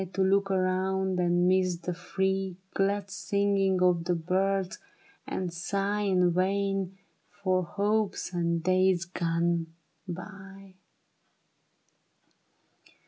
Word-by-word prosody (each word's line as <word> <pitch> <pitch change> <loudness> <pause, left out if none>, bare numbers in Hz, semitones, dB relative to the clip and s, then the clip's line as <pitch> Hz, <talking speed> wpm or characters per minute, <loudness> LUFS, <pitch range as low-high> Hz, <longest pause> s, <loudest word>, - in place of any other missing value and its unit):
To 190 +1 +1
look 195 +1 +2
around 190 0 0
and 175 0 +3
miss 185 -1 +2
the 175 +1 -4
free 190 +1 -2 0.2
Glad 200 0 0
singing 195 -2 +1
of 175 -2 +3
the 180 0 +1
birds, 190 +3 0 0.5
and 180 -2 -3
sigh 200 +4 -1
In 180 -3 +3
vain 195 +1 0 0.3
for 185 -2 0
hopes 205 +1 -1
and 170 -1 0
days 185 0 +3
gone 170 -1 0 0.4
by. 195 +1 -9
185 Hz, 100 wpm, -28 LUFS, 180-195 Hz, 0.5 s, and